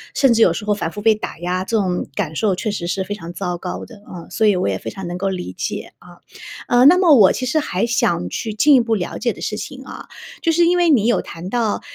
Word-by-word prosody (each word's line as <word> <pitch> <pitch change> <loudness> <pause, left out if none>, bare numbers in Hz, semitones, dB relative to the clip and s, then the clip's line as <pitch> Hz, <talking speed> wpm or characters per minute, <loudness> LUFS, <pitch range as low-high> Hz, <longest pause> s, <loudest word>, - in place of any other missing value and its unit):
甚 270 -4 +4
至 230 - +1
有 180 - +6
时 190 +5 -5
候 210 - +2
反 180 -5 -3
复 205 - -7
被 225 - +5
打 - - -5
压。 180 +2 -2
这 230 - +1
种 185 -4 -1
感 175 -7 -2
受 200 +1 +1
确 215 +4 -3
实 175 -4 -4
是 190 +1 -1
非 205 - -5
常 175 -4 -8
糟 180 0 -3
糕 180 +1 -6
的， 230 - -14
啊， 175 -2 -10
所 220 - +1
以 205 - +4
我 180 - 0
也 95 - -1
非 115 - -6
常 190 +10 -8
能 175 +1 -5
够 195 +2 -2
理 180 - -5
解， - - -5
啊。 175 0 -16 0.5
呃， 245 +1 +4
那 340 +6 +8
么 360 -4 +5
我 200 -5 +6
其 255 - -3
实 310 +5 +1
还 195 -10 -1
想 235 - 0
去 215 - -4
进 285 +7 +5
一 - - +6
步 230 -1 -1
了 180 -4 -4
解 235 -3 -1
的 - - -13
事 210 - -3
情 265 +5 -8
啊， - - -10 0.3
就 330 - +2
是 340 +1 +3
因 355 +1 +3
为 350 -1 +3
你 245 -9 +4
有 240 - +2
谈 170 +2 -9
到， 230 -2 -1
210 Hz, 300 characters per minute, -19 LUFS, 180-245 Hz, 0.5 s, 那